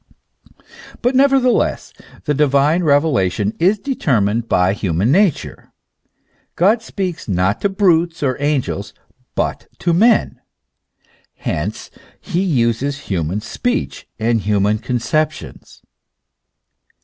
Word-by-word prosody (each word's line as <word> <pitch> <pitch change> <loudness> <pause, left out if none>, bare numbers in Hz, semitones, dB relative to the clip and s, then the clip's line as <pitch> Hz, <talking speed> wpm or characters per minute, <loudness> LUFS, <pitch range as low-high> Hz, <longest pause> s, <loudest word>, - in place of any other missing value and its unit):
But 245 +2 +2
nevertheless 270 -2 +2 0.3
the 150 - 0
divine 145 +3 +2
revelation 130 - +1
is 190 +6 +3
deter 195 - 0
mined 105 +3 -1
by 90 +1 +2
the 105 - -9
human 95 +5 0
nature. 190 -1 0 0.8
God 210 +6 +3
speaks 190 -6 -5
not 95 0 0
to 200 - +1
brutes 175 -5 +1
or 130 -2 +1
angels, 125 -8 -2 0.4
but - - -2
to 175 - 0
men; 225 +7 +2 0.9
hence - - -4 0.3
he 180 -3 -2
uses 135 - 0
human 90 +4 -2
speech 245 - -3
and 115 0 0
human 105 +1 +1
conceptions. 140 +7 -3
145 Hz, 105 wpm, -18 LUFS, -, 0.9 s, is